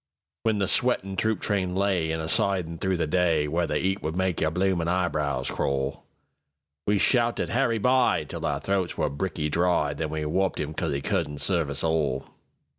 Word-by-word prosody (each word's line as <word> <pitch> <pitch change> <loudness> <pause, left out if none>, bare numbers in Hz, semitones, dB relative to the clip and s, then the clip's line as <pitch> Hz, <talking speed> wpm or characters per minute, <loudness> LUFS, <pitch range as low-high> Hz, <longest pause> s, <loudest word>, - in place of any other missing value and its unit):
When 110 -2 +1
the 100 -1 +1
sweatin' 100 -5 +1
troop 110 +3 0
train 95 -3 -1
layIn 90 -5 +1
a 80 - -3
sidin' 85 -2 0
through 95 -1 0
the 85 - 0
day, 80 -1 +2
Where 85 +3 0
the 75 - 0
'eat 95 +2 0
would 80 +2 -3
make 95 -2 0
your 80 - +3
bloomin' 90 0 0
eyebrows 75 -7 0
crawl, 70 0 -2 0.8
We 105 0 +3
shouted 120 +2 +2
"Harry 120 -2 +1
By!"Till 125 +3 +1
our - - 0
throats 95 -3 -1
were - - 0
bricky 75 +1 -2
dry, 85 -2 +1
Then 75 +2 -3
we 75 0 -3
wopped 95 +5 0
'im 75 +1 -3
'cause - - -2
'e 70 0 -2
couldn't 75 +1 -1
serve 85 -6 +1
us 70 - -3
all. 80 -5 0
85 Hz, 185 wpm, -26 LUFS, 75-95 Hz, 0.8 s, your